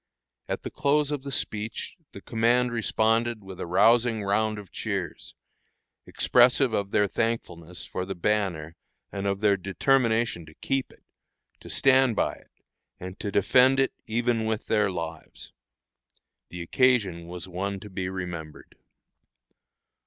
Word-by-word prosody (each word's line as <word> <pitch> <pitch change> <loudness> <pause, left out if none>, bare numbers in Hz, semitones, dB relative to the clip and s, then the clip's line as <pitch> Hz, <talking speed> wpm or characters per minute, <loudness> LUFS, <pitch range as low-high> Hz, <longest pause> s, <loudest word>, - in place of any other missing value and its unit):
At - - -4
the - - -5
close 145 +1 +1
of 145 -2 -2
the 140 +1 -7
speech 110 -3 -4 0.2
the - - -11
command 120 +2 +2
responded 115 0 +1
with 95 -2 -10
a - - -4
rousing 115 +4 +3
round 110 +2 +1
of 100 -3 -10
cheers, - - -5 0.7
expressive 125 0 +4
of 100 -2 -1
their 105 0 +2
thankfulness 90 -7 -3
for 90 - -4
the 95 +1 -5
banner 85 -5 -1 0.4
and 100 0 -3
of 100 0 -1
their 100 -2 +4
determination 115 0 +1
to 80 - -15
keep 135 -1 -2
it, - - -22 0.6
to - - -12
stand 130 -3 +4
by - - +1
it, - - -18 0.5
and 95 +2 -8
to 105 - -3
defend 125 +7 +4
it 135 - +2
even 115 0 0
with 110 -1 -2
their 105 -2 +2
lives. 85 -3 -7 1.0
The 90 0 -6
occasion 100 -6 +2
was 90 +1 -7
one 95 +2 -3
to 105 - -10
be 90 -1 -3
remembered. 90 -5 -7
105 Hz, 145 wpm, -26 LUFS, 95-120 Hz, 1.0 s, expressive